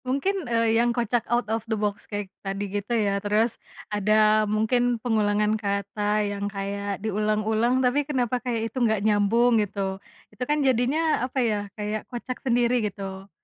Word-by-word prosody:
Mungkin, 285 +5 -1
eee, 230 -1 +3
yang 240 - +2
kocak 240 0 +1
out 240 +1 +1
of 225 - +1
the 220 - 0
box 205 -1 -3
kayak 205 -2 -5
tadi 195 +1 -3
gitu 205 +3 -2
ya. 200 -2 +1
Terus 210 +3 0 0.3
ada 215 +1 +3
mungkin 240 +3 +1
pengulangan 210 -2 +1
kata 205 +1 -1
yang 205 0 -3
kayak 200 0 -3
diulang-ulang, 220 +4 +1
tapi 260 +4 +3
kenapa 255 -4 -1
kayak 230 -3 -2
itu 260 - -2
nggak 220 -3 +2
nyambung 220 +3 +3
gitu. 195 -1 -3 0.3
Itu 210 - -5
kan 295 -1 +2
jadinya, 270 +6 +2
apa 255 +2 -3
ya, 210 -2 0 0.2
kayak 210 0 -4
kocak 250 0 -6
sendiri 245 -1 +2
gitu. 195 0 -8
215 Hz, 160 wpm, -25 LUFS, 205-245 Hz, 0.3 s, eee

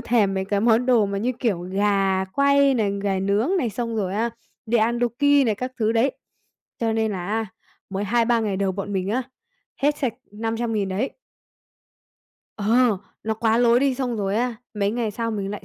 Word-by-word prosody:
thèm 225 -5 +2
mấy 190 0 -1
cái 200 +1 0
món 230 +2 +3
đồ 235 -5 +4
mà 200 0 -3
như 245 +5 0
kiểu 210 -8 0
gà 195 +1 +1
quay 280 +6 +3
này, 210 -4 +1
gà 195 -2 0
nướng 200 - +1
này 245 -9 0
xong 230 +1 -3
rồi 195 -2 -1
á, 230 +2 0 0.4
đi 230 +1 +2
ăn 235 +2 +2
Dookki 280 +4 +3
này 220 - +2
các 255 +4 -5
thứ 220 0 +2
đấy, 240 +4 +2 0.7
cho 225 -1 +1
nên 220 -1 0
là 180 -2 -4
á 220 +2 -1 0.4
mới 195 +1 -2
2-3 235 +2 +2
ngày 205 -3 -1
đầu 195 -1 0
bọn 200 +1 -5
mình 190 0 -1
á, 245 +5 0 0.6
hết 295 +1 +3
sạch 255 -5 -1 0.2
500.000 225 -1 -2
đấy. 210 +9 -1 1.5
Ờ, 215 +2 +1 0.5
nó 220 0 -1
quá 225 +1 +1
lố 240 0 +5
đi, 270 0 +2
xong 250 -2 -2
rồi 200 -1 -1
á, 245 +1 0 0.2
mấy 200 -1 0
ngày 230 -1 -1
sau 230 +2 -3
mình 200 -3 -3
lại 205 - -7
220 Hz, 200 wpm, -23 LUFS, 200-240 Hz, 1.5 s, lố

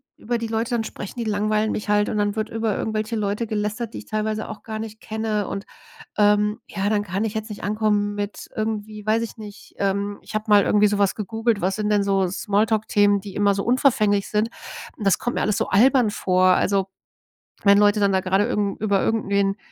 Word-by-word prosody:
über 240 +2 -2
die 230 0 -4
Leute 225 +1 -2
dann 235 -2 0
sprechen, 205 -2 -7
die 235 - -2
langweilen 215 +1 0
mich 210 - -5
halt. 210 0 +3
Und - - -2
dann 205 -1 0
wird 215 0 -1
über 225 -2 -1
irgendwelche 215 +1 -2
Leute 210 +2 -1
gelästert, 215 +2 -3
die - - -6
ich - - -9
teilweise 215 0 -2
auch 205 - -8
gar 220 -1 -5
nicht 220 0 -7
kenne 215 -2 -2
und, 200 0 -5 0.5
ähm 210 0 +3
ja, 195 0 -2
dann 205 -1 +1
kann 195 +2 -2
ich 220 -1 -3
jetzt 220 0 -4
nicht 210 - -8
ankommen 210 -1 0
mit 205 0 -5
irgendwie, 215 -1 -4
weiß 220 +2 +2
ich 230 - -6
nicht. 210 -2 -11
Ähm, 200 +1 -1
ich - - -12
habe 215 +1 -2
mal 205 -1 +6
irgendwie 210 0 +4
sowas 200 -1 +1
gegoogelt. 225 +1 -1
Was 190 +2 0
sind 210 -1 -1
denn 205 -1 +3
so 195 -1 +1
Small-Talk-Themen, 205 +1 +1
die 195 -1 -9
immer 205 -1 +3
so 200 - -2
unverfänglich 220 -5 +2
sind. 215 +1 0 0.5
Und 210 - -6
das 195 - +4
kommt 245 - -2
mir - - 0
alles 210 -1 +1
so - - -1
albern 245 +3 +4
vor. 185 -2 +1
Also, 195 +1 +3 0.8
wenn 200 -1 +6
Leute 205 +1 +4
dann 200 -1 +2
da 190 - +2
grade 190 +2 +2
irgend 205 -5 -1
über 200 -3 +2
irgendwen 200 -3 +1
210 Hz, 215 wpm, -23 LUFS, 200-220 Hz, 0.8 s, mal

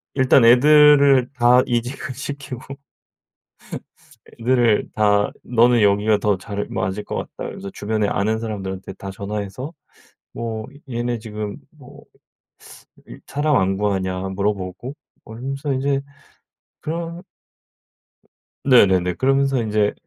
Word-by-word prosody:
일단 130 -2 +4
애들을 140 0 +6
다 125 +1 +5
이직을 120 +2 -3
시키고 140 -2 -6 1.9
애들을 120 -4 +2
다 105 -1 +2
"너는 120 -1 +3
여기가 105 +1 +3
더 105 -3 0
잘 100 +1 -5
맞을 95 +2 -3
것 - - -5
같다." - - -5
그러면서 100 - -6
주변에 105 0 -2
아는 110 +3 0
사람들한테 95 -4 -5
다 95 0 -8
전화해서 105 - -5 0.6
뭐 110 -1 -4 0.2
얘네 120 -1 -2
지금 105 -1 -6 0.2
뭐 - - -15 1.0
일 - - -12
사람 145 0 +1
안 95 +1 +1
구하냐 95 -3 -1
물어보고 100 +5 -3 0.3
뭐 110 - -10
이러면서 135 +3 -3
인제 135 +1 0 0.8
그런 170 +2 -5 1.4
네네네. 95 -9 +4
그러면서 135 -1 +2
인제 105 -1 +1
115 Hz, 245 characters per minute, -21 LUFS, 100-130 Hz, 1.9 s, 애들을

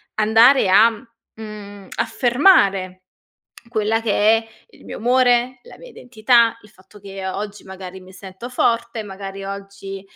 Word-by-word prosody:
andare 225 +2 +4
a 215 +5 +6 0.4
mhmm, 205 -3 -10
affermare 200 - +2 0.7
quella 220 -1 -1
che 225 - -2 0.3
è 225 - -10 0.2
il - - -20
mio - - -7
umore, 245 +1 +1
la - - -14
mia - - -13
identità, 235 - +1
il 210 - -19
fatto 190 +1 -20
che 195 -1 -8
o 185 - -5
oggi, 205 0 -7
magari, 190 0 -10
mi 185 0 -16
sento 190 +5 -10
forte, 235 -2 -1
magari 195 -1 -9
oggi, 195 0 -8
210 Hz, 140 wpm, -20 LUFS, 195-235 Hz, 0.7 s, a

